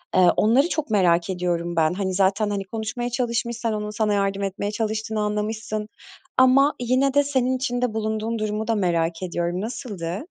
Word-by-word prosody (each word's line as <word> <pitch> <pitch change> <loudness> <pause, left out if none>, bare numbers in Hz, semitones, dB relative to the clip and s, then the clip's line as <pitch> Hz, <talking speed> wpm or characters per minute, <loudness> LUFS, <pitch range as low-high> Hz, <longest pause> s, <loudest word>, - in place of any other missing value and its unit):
Eee, 180 -1 +6
onları 260 +10 +4
çok 305 -6 -2
merak 175 -4 +3
ediyorum 175 -2 -1
ben. 160 +1 +3
Hani, 190 -1 -2
zaten 200 +2 +2
hani, 200 -1 -2
konuşmaya 225 +4 -4
çalışmış, 235 -1 -1
sen 230 -2 -1
onun 210 0 -3
sana 210 0 0
yardım 200 0 0
etmeye 195 +1 -2
çalıştığını 220 0 -2
anlamışsın 210 0 -2 0.5
ama 265 +3 +5
yine 255 +3 +2
de 285 0 +4
senin 260 -2 +1
içinde 245 -3 -1
bulunduğun 220 +1 -2
durumu 215 +1 -2
da 225 - +1
merak 170 -2 0
ediyorum. 175 +1 -2
Nasıldı? 205 - -5
215 Hz, 170 wpm, -23 LUFS, 190-235 Hz, 0.5 s, Eee